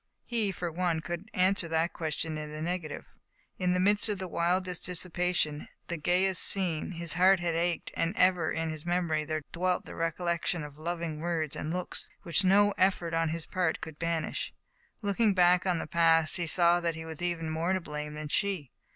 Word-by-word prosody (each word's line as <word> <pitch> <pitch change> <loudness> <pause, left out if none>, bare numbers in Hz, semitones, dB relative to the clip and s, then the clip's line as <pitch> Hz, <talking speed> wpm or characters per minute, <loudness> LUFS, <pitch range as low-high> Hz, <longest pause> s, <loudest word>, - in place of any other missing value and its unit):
He, 225 -4 +1
for 175 -2 -4
one, 170 -1 0
could 175 +6 -6
answer 185 -1 +2
that 165 +1 0
question 160 0 -3
in 155 0 -5
the 155 0 -7
negative. 170 -1 -4 0.5
In 180 -1 +2
the 180 - +1
midst 205 +3 +3
of 205 - -1
the 185 0 -5
wildest 180 +1 -1
dissipation, 175 -4 -1 0.2
the 170 - -2
gayest 180 +3 +2
scene, 185 -3 +2
his 170 -1 -1
heart 185 +1 +5
had 175 -1 -1
ached, 170 +1 -1
and 165 +5 0
ever 180 -3 +3
in 160 0 -1
his 155 -1 -7
memory 170 -3 0
there 155 0 -3
dwelt 180 +1 0
the - - -9
recollection 170 0 -1
of 150 0 -10
loving 165 -1 -3
words 160 -2 -2
and 155 - -4
looks, 180 +1 -2
which 175 +1 +3
no 205 +2 +5
effort 185 -3 +2
on 165 0 +1
his 165 0 -4
part 180 -4 0
could 160 -2 -8
banish. 165 -1 -2 0.5
Looking 205 0 +2
back 180 0 +4
on 180 -2 +2
the - - -3
past, 165 0 +3
he 170 -2 -2
saw 175 +1 +4
that 170 -2 -1
he 160 0 -7
was 160 0 -8
even 170 -2 -1
more 165 +3 0
to 190 - +1
blame 150 -3 -6
than 150 0 -5
she. 185 -7 0
170 Hz, 195 wpm, -30 LUFS, 160-180 Hz, 0.5 s, heart